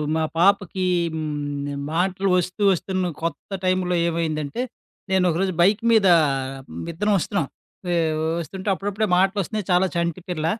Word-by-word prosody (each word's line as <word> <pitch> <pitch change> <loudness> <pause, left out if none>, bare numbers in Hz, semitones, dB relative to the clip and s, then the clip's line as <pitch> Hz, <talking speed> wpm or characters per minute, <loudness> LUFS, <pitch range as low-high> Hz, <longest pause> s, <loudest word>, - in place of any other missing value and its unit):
మా 160 - +1
పాపకి 190 0 +2 0.3
హ్మ్, 145 -2 -3 0.2
మాటలు 190 +3 0
ఒస్తూ 180 +3 -1
ఒస్తున్న 185 0 -2
కొత్త 165 0 -4 0.2
టైంలో 185 -1 +1
ఏమైందంటే. 160 - -2 0.5
నేను 190 -1 +3
ఒకరోజు 185 +3 0
బైక్ 200 +5 +3
మీద 220 -4 +5 0.8
విద్దరం 205 +6 0
ఒస్తున్నాం. 175 -2 -1 0.5
య్! 170 - +2 0.4
ఒస్తుంటే 190 +5 -5
అప్పుడప్పుడే 205 +3 -2
మాటలోస్తున్నాయి 195 +1 0
చాలా 180 +1 +4
చంటి 170 +1 -1
పిల్ల. 155 -2 -2
180 Hz, 125 wpm, -23 LUFS, 165-195 Hz, 0.8 s, మీద